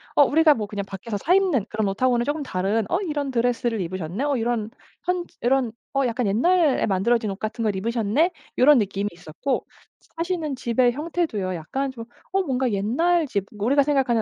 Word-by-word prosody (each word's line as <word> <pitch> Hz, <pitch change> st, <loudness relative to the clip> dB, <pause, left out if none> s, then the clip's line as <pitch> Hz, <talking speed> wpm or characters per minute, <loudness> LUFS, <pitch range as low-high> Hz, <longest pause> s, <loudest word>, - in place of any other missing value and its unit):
어 290 Hz, -, +7 dB
우리가 310 Hz, +1 st, +5 dB
뭐 215 Hz, -2 st, -3 dB
그냥 200 Hz, -1 st, -4 dB
밖에서 200 Hz, +2 st, -5 dB
사 340 Hz, -, +2 dB
입는 355 Hz, -, +2 dB
그런 215 Hz, -2 st, -1 dB
옷하고는 240 Hz, +4 st, +1 dB
쪼끔 295 Hz, +3 st, -1 dB
다른 205 Hz, -2 st, -1 dB
'어 355 Hz, -, +2 dB
이런 295 Hz, -6 st, -2 dB
드레스를 240 Hz, -2 st, 0 dB
입으셨네? 185 Hz, -, -3 dB
어 290 Hz, -1 st, +1 dB
이런 230 Hz, -1 st, -1 dB, 0.3 s
현지 360 Hz, -1 st, -3 dB
이런 250 Hz, -1 st, +2 dB, 0.2 s
어 275 Hz, -1 st, +2 dB
약간 240 Hz, +1 st, -1 dB
옛날에 290 Hz, -, +3 dB
만들어진 215 Hz, +3 st, +1 dB
옷 195 Hz, -, -4 dB
같은 220 Hz, +2 st, -3 dB
걸 210 Hz, -3 st, 0 dB
입으셨네?' 230 Hz, -, +1 dB, 0.3 s
이런 275 Hz, 0 st, +6 dB
느낌이 200 Hz, 0 st, -1 dB
있었고 175 Hz, -, -3 dB, 0.5 s
사시는 335 Hz, -5 st, -2 dB
집의 245 Hz, 0 st, +2 dB
형태도요 295 Hz, -, -2 dB
약간 265 Hz, -, -3 dB
좀 230 Hz, -3 st, -9 dB, 0.3 s
어 390 Hz, -, +2 dB
뭔가 265 Hz, -6 st, 0 dB
옛날 300 Hz, -, +1 dB
집 200 Hz, -5 st, -2 dB
우리가 270 Hz, +7 st, +3 dB
생각하는 265 Hz, -6 st, +2 dB
240 Hz, 390 characters per minute, -24 LUFS, 205-290 Hz, 0.5 s, 어